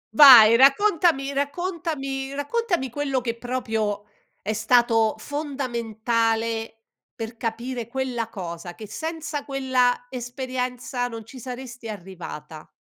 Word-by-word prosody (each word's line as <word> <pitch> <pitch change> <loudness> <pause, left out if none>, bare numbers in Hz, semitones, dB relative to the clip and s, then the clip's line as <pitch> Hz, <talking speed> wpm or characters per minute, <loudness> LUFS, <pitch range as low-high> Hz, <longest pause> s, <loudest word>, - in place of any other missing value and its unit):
Vai 235 -5 +10
raccontami 280 - +4
raccontami 285 -3 -3
raccontami 330 - -1
quello 275 0 -1
che 235 -2 -3
proprio 225 -4 -2 0.4
è 215 - -1
stato 225 0 +3
fondamentale 230 -5 -2 0.3
per 225 0 -6
capire 235 +1 -4
quella 250 -2 -2
cosa, 175 -3 -7
che 215 - -9
senza 315 +3 -4
quella 260 -3 +1
esperienza 250 0 -3
non 230 -2 -8
ci 255 +4 -11
saresti 245 -1 -8
arrivata. 170 -6 -9
245 Hz, 105 wpm, -24 LUFS, 225-275 Hz, 0.4 s, Vai